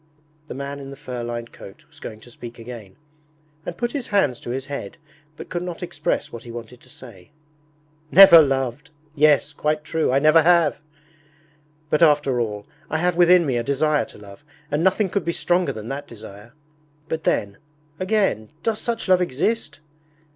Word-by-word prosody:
The - - -7
man 140 +1 -5
in 135 -1 -9
the 140 - -9
fur 125 -3 -7
lined 120 0 -5
coat 95 - -13
was - - -18
going 110 0 -9
to 120 - -15
speak 120 0 -10
again, 115 -5 -10 0.7
and 170 - -5
put 240 0 -2
his 280 -5 -4
hands 150 - +1
to - - -9
his 130 +2 -3
head, 140 -8 -6 0.4
but - - -9
could 175 - -3
not 175 -1 -6
express 180 - -2
what 115 - -8
he 120 - -12
wanted 120 +1 -9
to 130 - -20
say. 115 -9 -14 0.8
'Never 180 -2 +10
loved!... 135 -1 -1 0.2
Yes, 150 -1 +3
quite 150 +1 -1
true, 160 -2 0
I 135 - +3
never 155 +3 +5
have! 170 -2 +3 1.1
But 150 - +2
after 145 -5 +4
all, 105 -2 -4 0.2
I 160 - 0
have 175 +1 +1
within 175 0 +5
me 130 -4 0
a 120 - -1
desire 145 +3 +1
to - - -15
love, 100 +4 -14 0.3
and 150 +3 0
nothing 190 +2 +2
could 190 0 -2
be 170 - -2
stronger 175 +1 +1
than 110 +1 -8
that 140 +1 -5
desire! 105 0 -12 0.5
But 160 0 -4
then, 100 -1 -1 0.4
again, 185 - 0
does 220 -2 -1
such 230 -2 -3
love 185 -1 +4
exist? 155 - -2
145 Hz, 185 wpm, -22 LUFS, 120-170 Hz, 1.1 s, Never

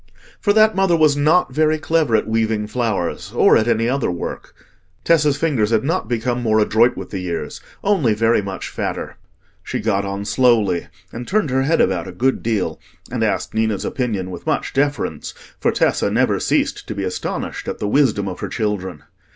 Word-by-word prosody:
For 205 - +2
that 215 0 +5
mother 195 -3 +3
was 155 -3 +4
not 150 0 +2
very 155 +2 +2
clever 155 -6 +1
at - - +1
weaving 110 -1 0
flowers 105 -6 -2
or - - +5
at 110 - +2
any 115 -1 +2
other 135 +1 0
work. 90 - -6 0.5
Tessa's 150 -4 +3
fingers 140 -9 +1
had 110 -2 +2
not 165 -1 -1
become 120 +1 -1
more 110 -2 +2
adroit 110 +3 +3
with - - -7
the 95 - -3
years—only 110 - -2
very 115 0 +2
much 95 -2 -6
fatter. - - -4 0.4
She - - -4
got 100 -3 0
on 100 0 -4
slowly 115 -8 +2 0.3
and 120 +1 -6
turned 190 -8 0
her 130 +1 +2
head 160 +5 +1
about 90 -3 0
a - - -6
good 130 +2 0
deal, 100 -8 -1 0.3
and - - -1
asked - - -1
Ninna's 110 -2 0
opinion 105 -8 -2
with 90 - -9
much - - -1
deference; 145 +1 -1 0.2
for - - +2
Tessa - - +1
never - - +1
ceased - - 0
to 110 - -5
be 100 - -3
astonished 90 -1 -4
at - - -3
the 105 - -3
wisdom 110 -5 +2
of 90 - -5
her - - -4
children. 95 -7 -3
115 Hz, 185 wpm, -20 LUFS, 105-145 Hz, 0.5 s, that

